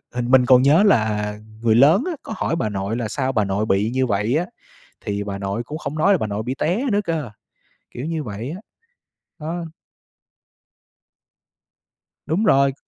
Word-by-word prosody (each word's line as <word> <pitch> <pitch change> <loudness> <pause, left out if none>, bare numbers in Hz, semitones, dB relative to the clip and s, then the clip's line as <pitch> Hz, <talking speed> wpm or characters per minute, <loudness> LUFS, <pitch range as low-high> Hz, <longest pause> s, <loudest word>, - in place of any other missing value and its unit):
hình 125 0 -2
mình 130 -1 +6
còn 125 0 +6
nhớ 150 +9 +5
là 105 - +1 0.2
người 115 -2 +3
lớn 150 - +5
á, - - -1
có 220 - -6
hỏi 165 - -1
bà 110 -10 -1
nội 100 +2 -3
là 120 -2 -2
sao 130 +4 -2
bà 110 -5 +1
nội 100 +2 -1
bị 105 +1 +1
như 130 0 +1
vậy 105 +4 0
á? 175 - 0 0.6
Thì 100 0 -2
bà 100 -1 -5
nội 100 +4 -3
cũng 150 +5 -6
không 155 -1 -5
nói 200 +6 +4
là - - +1
bà 110 - -2
nội 105 +1 -3
bị 125 +3 -3
té 180 - -1
nữa 205 - +2
cơ, 160 - -3 0.6
kiểu 125 +5 -6
như 160 -2 -2
vậy 110 +4 -6
á. 180 +5 -7 0.8
Đó. 165 +3 -4 2.6
Đúng 165 +8 0
rồi. 140 -9 +4
125 Hz, 185 wpm, -21 LUFS, 105-155 Hz, 2.6 s, mình